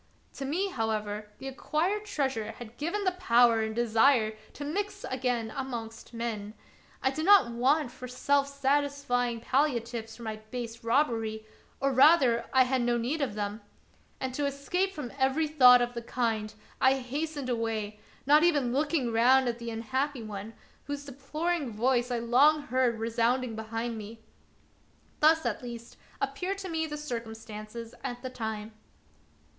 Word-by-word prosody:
To 275 - -5
me, 360 +8 0
however, 215 - -2
the 270 - -8
acquired 340 +10 -1
treasure 265 - -2
had 235 +1 -11
given 345 +8 -2
the 370 - +2
power 240 -10 +4
and 220 0 -2
desire 230 -1 +3 0.2
to 290 - -6
mix 400 +7 -3
again 245 -3 -1
amongst 235 -5 -6
men. 225 -3 -4 0.5
I 265 - +3
did 310 +3 -3
not 380 -10 +6
want 260 +3 +2
for 255 - -9
self 275 +3 +1
satisfying 280 -4 0
palliatives 235 -5 -1
for 240 - -10
my 220 -1 -4
base 235 -1 -6
robbery, 225 -4 0 0.3
or, 275 0 +1
rather, 260 -4 +5
I 260 -1 +6
had 255 0 0
no 240 0 +1
need 260 +7 -1
of 255 -7 -1
them; 210 +1 -3 0.6
and 260 -1 -3
to 285 +2 0
escape 355 +8 -1
from 295 -9 -7
every 270 +4 +2
thought 250 -5 +7
of 240 0 -3
the 235 - -4
kind, 225 -3 -1 0.3
I 265 +1 +5
hastened 285 +2 -4
away, 225 -3 -2 0.3
not 295 +2 +6
even 290 -8 +2
looking 290 -3 +1
round 255 +3 +5
at 240 0 -2
the 235 0 -5
unhappy 260 +3 -2
one, 210 +1 -7 0.3
whose 285 0 -5
deploring 285 +1 -3
voice 245 +3 +1
I 245 - 0
long 270 +6 +4
heard 255 -3 +1
resounding 230 +2 0
behind 225 +1 -4
me. 220 +2 -10 1.0
Thus, 320 +1 +4
at - - -1
least, 235 -1 -8 0.2
appeared 380 +2 -2
to 385 -1 -6
me 320 -1 -1
the 300 -1 -5
circumstances 225 -4 -7
at 245 -2 -5
the 255 - -4
time. 220 -3 -5
250 Hz, 155 wpm, -29 LUFS, 230-285 Hz, 1.0 s, thought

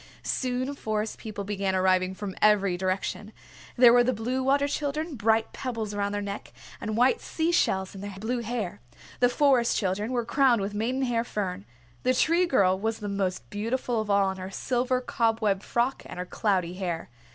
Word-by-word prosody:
Soon 255 +1 -1
Forest 215 -5 -3
People 215 -2 -6
began 195 -1 -1
arriving 185 0 +2
from 200 -1 -6
every 200 -3 +4
direction. 190 +3 -2 0.5
There 240 -1 +8
were 245 0 +6
the 255 +1 +1
Blue 245 +4 -2
Water 280 +2 +2
Children, 300 +3 -2
bright 225 -2 +1
pebbles 230 -5 -4
around 200 0 -1
their 205 0 -2
necks, 200 0 -6 0.3
and 215 0 -3
white 250 +2 +3
sea 325 +1 -1
shells 190 - +1
in 195 - -9
their 200 -1 -6
blue 240 +4 -1
hair. 225 - -4 0.4
The 245 - +5
Forest 255 -2 +3
Children 205 +3 -1
were 240 -2 0
crowned 255 -1 +3
with 200 +1 -3
maidenhair 240 +2 0
fern. 190 - -4 0.4
The 255 - +2
Tree 340 +6 +3
Girl 190 - +3
was 220 +2 -1
the 205 -2 -5
most 195 -2 -2
beautiful 230 +2 -1
of 215 - -6
all 200 -1 +3
in 190 - -7
her 185 0 -6
silver 250 +4 0
cobweb 225 -5 +1
frock 240 +5 0
and - - -9
her 180 - -3
cloudy 185 -3 0
hair. 175 -7 -4
220 Hz, 185 wpm, -27 LUFS, 195-250 Hz, 0.5 s, There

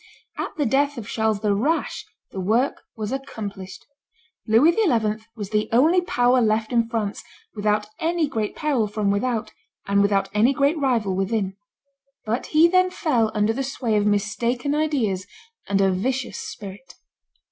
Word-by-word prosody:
At - - -5
the 295 - +1
death 280 +4 +1
of 220 -3 -6
Charles 220 -3 0
the 210 -2 +2
Rash, 285 +12 -1 0.2
the 190 - -6
work 225 +8 +1 0.2
was 215 -1 -4
accomplished; 205 -8 -6 0.6
Louis 230 +10 +5
XI. 225 - +1
was 205 -3 -6
the 210 0 0
only 315 +10 +4
power 245 -6 +2
left 220 0 +1
in 230 -1 +2
France, 220 -3 -3 0.3
without 210 0 0
any 330 -1 +1
great 220 -6 -3
peril 275 -8 0
from 210 -1 0
without, 225 +2 -1 0.3
and 200 0 +2
without 200 -1 +2
any 225 +6 +4
great 285 +4 +2
rival 235 -9 +1
within; 195 0 -1 0.7
but 225 +3 -2
he 315 +2 +5
then 370 +1 +3
fell 265 - 0
under 210 +1 +2
the 270 - -3
sway 255 -4 -2
of 210 0 +2
mistaken 235 +6 0
ideas 250 -12 0 0.4
and 200 -1 +1
a 195 -1 +3
vicious 250 +7 -2
spirit. 200 +4 -9
225 Hz, 160 wpm, -23 LUFS, 210-270 Hz, 0.7 s, Louis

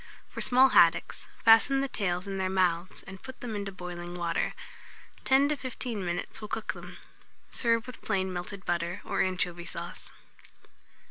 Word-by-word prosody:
For - - -6
small 260 +2 +6
haddocks, - - +4 0.2
fasten 230 +5 +6
the 275 - 0
tails 180 -6 -1
in 195 -1 -4
their 190 0 0
mouths, 185 -2 0
and 190 -1 -10
put 260 -1 -10
them 230 -3 -4
into 200 -1 -3
boiling 175 -2 -7
water. 170 -1 -1 0.7
10 275 +2 +5
to 300 - +2
15 245 -6 -4
minutes 175 +4 -3
will 210 - -5
cook 220 +1 -3
them. - - -10 0.5
Serve 230 -1 +2
with 250 -1 -10
plain 190 -3 -1
melted 180 +2 -6
butter, 175 +1 -1
or - - 0
anchovy 180 -2 -1
sauce. - - -5
195 Hz, 160 wpm, -29 LUFS, 180-235 Hz, 0.7 s, small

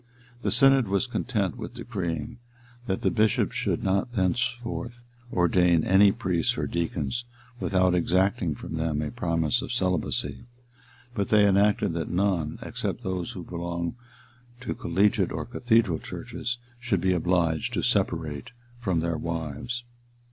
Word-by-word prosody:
The - - 0
synod 135 -3 +5
was 100 +5 +1
content 120 -4 -1
with 115 +1 -7
decreeing, 115 -2 -4 0.5
that 95 - -1
the - - +3
bishops 110 -1 +2
should - - -1
not 100 +6 0
thenceforth 120 +3 -1 0.3
ordain 90 -2 +3
any 100 +1 +6
priests 90 -4 0
or - - 0
deacons 85 - -2 0.4
without 95 -4 +2
exacting 90 -2 +2
from 80 - -6
them 80 -2 0
a 75 - -3
promise 85 +6 0
of - - -5
celibacy; 95 0 -1 0.7
but 100 -5 -1
they 105 -1 +6
enacted 100 -2 +3
that 85 -1 -3
none, 90 -4 0
except 120 - -4
those 95 -3 -3
who 90 - -7
belonged 85 0 -3 0.7
to 125 - -3
collegiate 100 +2 +2
or - - -3
cathedral 115 -8 +2
churches, 125 +1 -5 0.2
should 120 -6 0
be 95 +1 +2
obliged 85 -2 +1
to - - -1
separate 75 -4 0 0.3
from 95 -8 0
their 85 -1 -1
wives. 95 +10 -4
95 Hz, 140 wpm, -27 LUFS, 85-115 Hz, 0.7 s, any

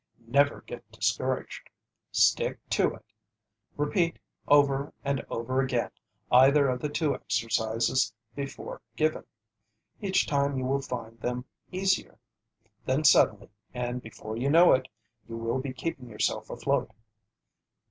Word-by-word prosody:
Never 140 +5 +2
get 115 -3 -10
discouraged. 110 +4 -2 0.4
Stick - - +3
to - - +2
it. - - -18 0.7
Repeat 165 +4 +1 0.3
over 140 -1 +3
and 140 -1 0
over 130 +3 -1
again 130 -1 -1 0.4
either 135 +3 +6
of 125 -1 -2
the 150 - -1
two 150 0 0
exercises 115 +1 0 0.2
before 140 -1 -6
given. 155 +2 0 0.8
Each 195 -2 +2
time 140 -1 +1
you 130 - -2
will 135 +2 +1
find 115 -3 -6
them 125 +2 -3 0.3
easier. 190 +1 0 0.7
Then 135 +4 0
suddenly, 105 -8 +4 0.2
and 125 0 -3
before 110 -1 -8
you 130 +4 0
know 170 +4 +7
it, 130 0 +1 0.4
you 115 - -5
will 115 +3 -1
be 130 0 -4
keeping 130 -1 -5
yourself 105 - -1
afloat. - - -1
130 Hz, 125 wpm, -28 LUFS, 120-145 Hz, 0.8 s, know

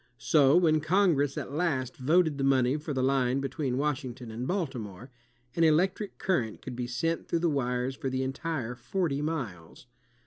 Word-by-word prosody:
So 145 +1 +4
when 160 -3 +4
Congress 155 -5 +2
at - - -4
last 140 -5 -1
voted 155 +2 +2
the - - 0
money 130 -1 +3
for 155 +1 -6
the 130 -2 0
line 130 -1 +2
between 135 -1 -2
Washington 130 -5 -3
and 120 +3 -4
Baltimore, 130 - -4 0.4
an 165 - +2
electric 185 +6 +2
current 120 - -1
could 130 - -6
be 120 0 -3
sent 165 +7 -2
through - - 0
the 170 0 +1
wires 125 -1 -1
for 135 - -3
the 130 0 -1
entire 135 -2 -3
forty 140 +4 -2
miles. 125 - -5
135 Hz, 170 wpm, -29 LUFS, 125-160 Hz, 0.4 s, So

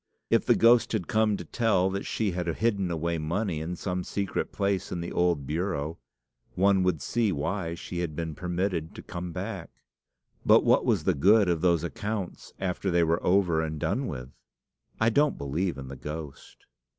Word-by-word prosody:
If - - +3
the - - +6
ghost 115 0 +5
had 105 -6 -1
come 110 -1 +2
to 90 - -7
tell 95 -1 +1
that 100 +1 -3
she 110 -3 0
had 90 0 -3
hidden 100 +1 0
away 85 0 -1
money 85 +1 -1
in 85 +3 -4
some 90 0 -3
secret 100 +1 -2
place 100 -1 -1
in 90 - -2
the 85 - -5
old 85 -5 +1
bureau, 80 0 -2 0.6
one 95 0 +4
would 90 -6 0
see 115 +2 +1
why 85 +2 -2
she 85 +1 -6
had 85 -4 -3
been 80 -1 -3
permitted 90 -1 -2
to - - -9
come 85 0 -6
back. 90 +4 -5 0.7
But - - +6
what - - +4
was - - +2
the - - +2
good 100 +7 +5
of 85 -3 +1
those 85 -3 +3
accounts 105 +2 -4
after 95 +1 -2
they 85 -1 +3
were 85 +1 +1
over 90 -3 +3
and 80 -1 -3
done 125 - -1
with? 65 -2 -6 0.7
I 110 +1 +3
don't 145 +5 +2
believe 80 +6 -2
in 70 -1 -7
the 70 - -7
ghost." 75 +1 -8
90 Hz, 185 wpm, -28 LUFS, 80-100 Hz, 0.7 s, the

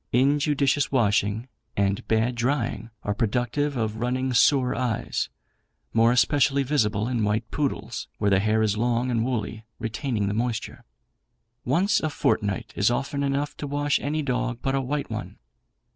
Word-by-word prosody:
Injudicious 140 +2 +2
washing 110 -2 +1 0.3
and 100 0 0
bad 110 +2 +2
drying 120 -3 -1
are 105 - 0
productive 125 +6 0
of 110 -2 -1
running 125 +2 -1
sore 130 0 +4
eyes, 120 -3 -1 0.6
more 115 +1 +5
especially 140 +2 +3
visible 110 -7 +1
in 120 -3 0
white 110 +2 -1
poodles, 120 -6 -2
where 105 -1 +1
the 95 - +5
hair 110 +2 +2
is 105 -2 +1
long 120 +2 0
and 115 -2 +1
woolly, 110 -3 -3
retaining 115 -2 -2
the 100 - -1
moisture. 115 +1 -3 0.8
"Once 185 - +3
a 155 - -1
fortnight 115 -6 -1
is 100 - +3
often 140 +3 -1
enough 140 +1 -1
to 145 - -4
wash 145 0 +1
any 150 +2 -1
dog 125 -2 -1
but 135 - 0
a 135 - +1
white 140 0 -3
one. 110 -5 -5
120 Hz, 155 wpm, -25 LUFS, 110-140 Hz, 0.8 s, more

